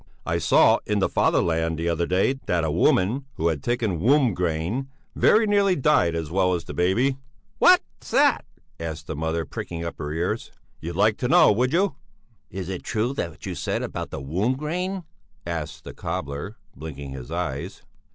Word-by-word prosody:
I - - 0
saw - - +5
in 105 - +1
the 100 - +2
'Fatherland' 80 -1 +1
the 85 +1 -2
other 85 0 0
day 95 +8 +2
that 85 -2 +1
a 80 - 0
woman 100 - +2
who 85 +1 +1
had 75 -4 -2
taken 115 -8 -1
womb 130 - +4
grain 90 +9 -2 0.3
very 220 +1 +5
nearly 200 -2 +3
died 130 - +3
as 80 -2 -4
well 90 0 +2
as 85 - -4
the - - -8
baby." 120 +10 +1 0.4
"What's - - +3
that?" - - +3 0.4
asked 80 -1 -5
the 80 - -5
mother, 80 +2 -2
pricking 85 +3 -6
up 85 - -6
her 75 - -4
ears. 90 +8 -2 0.3
"You'd 85 +1 -6
like 105 +3 +3
to 125 - -1
know, 175 0 +6
would 125 +5 +1
you?" 180 -3 +1 0.5
"Is 95 -1 -6
it 95 -2 -4
true 115 +4 -1
what 110 - -2 0.2
you 95 - -4
just 85 - -6
said - - -1
about - - -5
womb 90 - -1
grain?" 180 +5 -3 0.4
asked 85 -3 -5
the - - -9
cobbler, 70 +10 -5 0.2
blinking 70 -2 -7
his 65 -2 -8
eyes. - - -4
90 Hz, 180 wpm, -24 LUFS, 80-125 Hz, 0.5 s, know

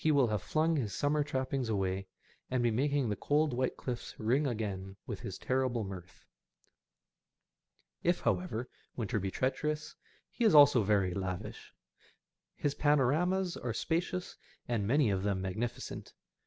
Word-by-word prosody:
will 140 -6 +4
have 105 -3 0
flung 160 - +1
his 110 -7 -2
summer 145 +1 +1
trappings 130 -3 -2
away, 95 -2 -1 0.4
and 125 -1 +1
be 120 - +3
making 140 +3 +1
the 105 - 0
cold 150 +3 +1
white 130 +1 -1
cliffs 125 -2 -5
ring 130 +7 +2
again 100 -5 -3
with 105 -5 -5
his 95 - -6
terrible 130 -3 0
mirth. 95 -2 -9 1.8
If, 175 +1 +1
however, 110 +3 -1 0.3
winter 110 -1 -1
be 95 0 -2
treacherous, 150 +6 -2 0.4
he - - -2
is 215 -8 +5
also 145 -5 +8
very 100 -3 +2
lavish. 95 -1 -5 0.8
His 145 - -1
panoramas 155 +7 +2
are 120 -2 -3
spacious, 175 +6 -2 0.3
and 110 -5 0
many 135 -2 +3
of 95 -1 0
them 100 -1 0
magnificent. 105 +6 -4
120 Hz, 140 wpm, -32 LUFS, 100-145 Hz, 1.8 s, also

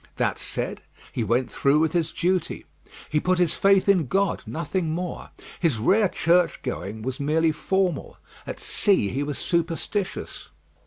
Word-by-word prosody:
That - - 0
said, - - -4 0.3
he 120 - -2
went 120 +4 0
through 140 +2 +3
with 160 0 +2
his 170 -3 0
duty. 180 0 -1 0.4
He 150 - +1
put 185 +3 +1
his 175 -3 +2
faith 195 0 +3
in 185 -8 +4
God 195 +5 +1
nothing 165 +1 -2
more. 175 +2 -4 0.3
His 160 -9 +2
rare 195 - +3
churchgoing 160 - 0
was 130 +1 -4
merely 160 +3 +2
formal. 180 0 -1 0.3
At - - -5
sea 190 - +2
he 135 - -2
was 145 -1 -3
superstitious. 170 +3 -2
165 Hz, 150 wpm, -25 LUFS, 145-185 Hz, 0.4 s, in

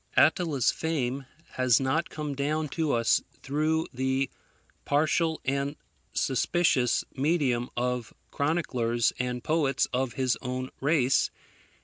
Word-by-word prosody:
Attila's 145 -1 +4
fame 135 -4 -2 0.2
has 130 -3 +3
not 140 +5 0
come 150 -2 -4
down 150 +2 -1
to 160 0 -1
us 115 -1 +3 0.2
through 155 +3 +1
the 130 +1 0 0.5
partial 160 +2 +1
and 140 +2 -1 0.4
suspicious 135 -1 +2
medium 135 -5 +1
of 125 -1 -1 0.2
chroniclers 125 -7 +1
and 125 -1 -2
poets 150 -4 +2
of 130 -1 0
his 130 0 0
own 130 0 -4
race. 135 -3 +3
135 Hz, 110 wpm, -28 LUFS, 125-155 Hz, 0.5 s, Attila's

